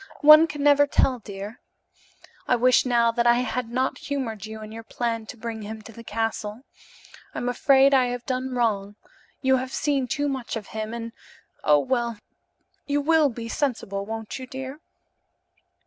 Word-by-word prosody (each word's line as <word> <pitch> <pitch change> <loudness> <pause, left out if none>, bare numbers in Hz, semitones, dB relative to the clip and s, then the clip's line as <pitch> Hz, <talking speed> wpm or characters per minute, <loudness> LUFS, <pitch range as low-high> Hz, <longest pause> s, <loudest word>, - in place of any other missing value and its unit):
One 305 +2 +9
can 295 -2 -5
never 290 0 +5
tell, 260 -3 +2
dear. 205 +1 -8 0.9
I 250 - +4
wish 250 +1 +4
now 235 -1 +3
that 235 0 +1
I 240 - +6
had 250 -1 -3
not 255 +2 -1
humored 225 -7 -4
you 220 0 -8
in 215 - -9
your 225 +1 -7
plan 230 -1 -3
to 245 - -9
bring 225 -1 -5
him 215 +1 -7
to 225 - -11
the 230 +1 -12
castle. 225 +1 -3 0.7
I'm 245 - -3
afraid 270 +2 +4
I 255 -2 +4
have 245 0 -4
done 255 0 -2
wrong. 205 -4 0 0.5
You 265 0 +4
have 255 0 -4
seen 275 -2 0
too 290 +4 -1
much 265 -4 -3
of 215 -3 -6
him 220 0 -4
and 230 0 -6 0.5
oh, 150 -1 +5
well, 235 - -1 0.7
you 290 0 +1
will 310 0 +3
be 230 -1 -7
sensible, 225 -7 -2
won't 225 +4 -6
you, 260 - -8
dear?" 265 +3 -7
240 Hz, 175 wpm, -25 LUFS, 225-265 Hz, 0.9 s, One